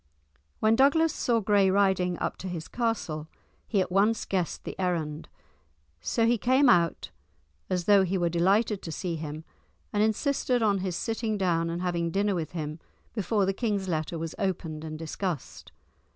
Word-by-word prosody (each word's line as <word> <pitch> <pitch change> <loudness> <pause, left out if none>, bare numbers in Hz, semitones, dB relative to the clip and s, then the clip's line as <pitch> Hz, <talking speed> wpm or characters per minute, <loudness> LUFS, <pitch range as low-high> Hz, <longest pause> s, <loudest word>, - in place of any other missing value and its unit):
When 220 +1 +4
Douglas 290 +5 +4
saw 235 -2 +1
Gray 200 -1 +3
riding 190 -2 +2
up - - -2
to 190 - -6
his 170 -3 -5
castle, 215 -10 -2 0.4
he 200 - +2
at 180 - -2
once 210 +4 +2
guessed 180 -4 -2
the - - -6
errand. 165 -4 -2 0.7
So 225 - +1
he 235 0 +2
came 260 +3 +4
out 170 - +2 0.6
as 180 -1 0
though 205 -1 +6
he 190 +1 0
were 175 -1 +1
delighted 195 +5 +2
to 165 - -6
see 170 +1 -3
him, 155 0 -6 0.5
and 205 - +2
insisted 245 +2 +1
on 200 -2 +2
his 185 -2 -2
sitting 225 +2 -2
down 170 -3 +1
and 170 +2 -3
having 170 -2 0
dinner 200 +3 +1
with 165 -3 -3
him, 155 -1 -4 0.3
before 210 -1 +1
the 195 - 0
king's 205 -3 -1
letter 160 -1 -2
was 165 0 -4
opened 165 -5 -2
and 155 -1 -6
discussed. 165 0 -5
190 Hz, 170 wpm, -28 LUFS, 170-215 Hz, 0.7 s, though